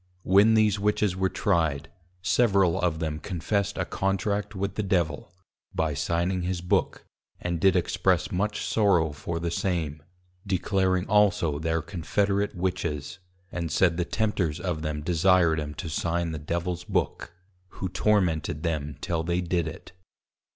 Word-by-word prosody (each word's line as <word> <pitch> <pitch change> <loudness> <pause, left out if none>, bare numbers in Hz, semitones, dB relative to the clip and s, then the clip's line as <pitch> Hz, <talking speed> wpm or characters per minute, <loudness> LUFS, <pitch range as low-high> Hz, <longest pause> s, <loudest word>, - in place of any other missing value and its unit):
When 100 +4 +5
these 105 -2 +3
Witches 105 -2 +1
were 95 0 +1
Tryed, 80 - 0 0.4
several 100 -4 +3
of 85 -3 +1
them 80 -2 -3
confessed 100 +3 -2
a 95 - 0
contract 100 +3 -1
with 100 0 -2
the 105 - -2
Devil, 85 -7 -1 0.4
by 80 -4 0
signing 85 +6 0
his 90 0 -2
Book, 90 +1 0 0.3
and 85 -1 -2
did 95 -1 +5
express 90 - +1
much 105 +3 -1
sorrow 90 -8 +3
for 80 +3 -4
the 85 0 -2
same, 80 -5 -2 0.5
declaring 95 -1 +1
also 100 -8 +2
thir 80 0 -1
Confederate 100 +5 -1
Witches, 90 -3 -3 0.3
and 85 -3 -3
said 85 +1 +3
the 90 - +1
Tempters 90 -7 -1
of 90 -4 -2
them 75 -1 -3
desired 85 -1 +3
'em 75 0 -5
to 85 - -5
sign 85 +2 -1
the 80 - -4
Devils 85 +3 -3
Book, - - -2 0.4
who 95 - -3
tormented 85 -6 +1
them 75 -3 -2
till 85 -2 -1
they 85 +2 0
did 85 -2 0
it. 80 +4 -8
90 Hz, 150 wpm, -26 LUFS, 80-95 Hz, 0.5 s, When